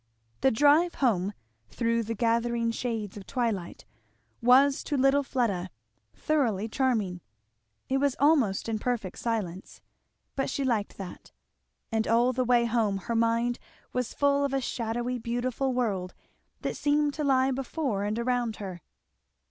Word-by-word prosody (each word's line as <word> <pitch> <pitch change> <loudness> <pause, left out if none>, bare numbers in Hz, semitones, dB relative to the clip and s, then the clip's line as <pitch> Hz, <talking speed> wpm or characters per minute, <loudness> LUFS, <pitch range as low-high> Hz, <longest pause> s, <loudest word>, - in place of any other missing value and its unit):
The 265 - +4
drive 295 +8 +4
home, 205 -7 +1 0.4
through 230 - 0
the 230 +1 -3
gathering 230 +1 +1
shades 225 -4 -3
of 195 - -10
twilight, 225 -9 -2 0.6
was 270 +3 +5
to 290 - -1
little 270 +2 +4
Fleda 220 -9 -1 0.5
thoroughly 230 - 0
charming. 215 -8 0 0.7
It 270 +1 +1
was 280 -2 +1
almost 275 -11 +3
in 220 -1 -1
perfect 225 -6 -3
silence, 200 -6 -3 0.6
but 270 - -1
she 275 - -2
liked 230 -6 -1
that; 190 -3 -9 0.6
and 220 0 0
all 240 +3 +3
the 255 +1 +1
way 240 -1 +3
home 225 -4 +1
her 210 +5 -4
mind 230 +1 +1 0.3
was 250 -2 -1
full 285 0 +2
of 275 -1 0
a - - +2
shadowy 240 0 -2
beautiful 245 +3 -1
world 205 -8 -1 0.5
that - - -2
seemed 295 0 +1
to 305 - -3
lie 265 -1 +3
before 265 -5 -2
and 210 +2 -1
around 240 -2 0
her. 185 -4 -7
235 Hz, 145 wpm, -28 LUFS, 220-265 Hz, 0.7 s, was